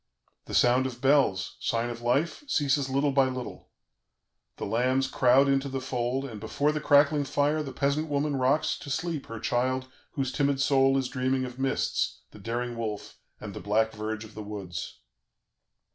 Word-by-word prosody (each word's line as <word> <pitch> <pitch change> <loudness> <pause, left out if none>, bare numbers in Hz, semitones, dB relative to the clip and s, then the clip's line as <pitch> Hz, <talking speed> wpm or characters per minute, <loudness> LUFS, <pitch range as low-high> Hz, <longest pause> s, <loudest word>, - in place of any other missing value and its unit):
"The - - -5
sound 125 +2 +4
of 120 -2 -8
bells, 130 -9 +2
sign 115 +1 -1
of 120 0 -8
life, 140 - 0
ceases 140 - +1
little 140 +2 +1
by 135 -1 +4
little; 130 -1 -7 0.9
the - - -4
lambs 130 +5 +1
crowd 130 +1 +4
into 135 0 +1
the 135 0 -3
fold, 130 +1 -2
and 115 -6 -7
before 145 +7 0
the 150 0 -3
crackling 145 0 +4
fire 145 +2 +1
the 140 -3 -5
peasant 140 +4 0
woman 145 0 0
rocks 135 +7 +1
to 170 -5 -9
sleep 160 0 -3
her 115 -1 -7
child 130 +3 -1 0.2
whose 135 -2 -1
timid 140 0 +1
soul 135 -1 +4
is 135 -1 0
dreaming 130 +1 -1
of 125 +1 -9
mists, 135 0 -1
the - - -13
daring 120 +3 -3
wolf, 110 -3 -5 0.2
and - - -7
the - - -6
black 110 +2 +1
verge 110 0 -4
of 110 - -14
the 110 - -7
woods. 100 -4 -7
130 Hz, 175 wpm, -28 LUFS, 120-140 Hz, 0.9 s, sound